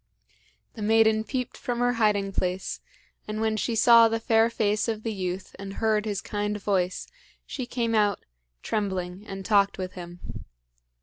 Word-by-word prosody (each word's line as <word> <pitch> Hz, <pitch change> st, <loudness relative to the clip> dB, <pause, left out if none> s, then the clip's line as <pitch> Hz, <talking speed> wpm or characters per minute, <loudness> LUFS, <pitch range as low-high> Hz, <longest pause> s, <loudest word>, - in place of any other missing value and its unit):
The 220 Hz, -, -9 dB
maiden 220 Hz, 0 st, +4 dB
peeped 250 Hz, +1 st, -4 dB
from 245 Hz, -1 st, -3 dB
her 245 Hz, 0 st, +2 dB
hiding 210 Hz, -4 st, +1 dB
place, 185 Hz, 0 st, -2 dB, 0.5 s
and 215 Hz, 0 st, -4 dB
when 220 Hz, 0 st, +1 dB
she 225 Hz, +2 st, -1 dB
saw 230 Hz, +1 st, +7 dB
the 225 Hz, 0 st, -1 dB
fair 225 Hz, 0 st, +3 dB
face 210 Hz, -2 st, 0 dB
of 220 Hz, -1 st, -3 dB
the 225 Hz, -, -2 dB
youth 185 Hz, -1 st, -4 dB
and 195 Hz, 0 st, -6 dB
heard 215 Hz, -1 st, +1 dB
his 205 Hz, -2 st, -2 dB
kind 210 Hz, 0 st, -3 dB
voice, 185 Hz, -3 st, -1 dB, 0.4 s
she 255 Hz, -3 st, -5 dB
came 230 Hz, -2 st, -1 dB
out, 210 Hz, -2 st, +2 dB, 0.4 s
trembling, 190 Hz, -1 st, -3 dB
and 195 Hz, 0 st, -7 dB
talked 200 Hz, -2 st, +3 dB
with 185 Hz, -1 st, -4 dB
him. 175 Hz, -1 st, -9 dB
210 Hz, 165 wpm, -26 LUFS, 195-225 Hz, 0.5 s, saw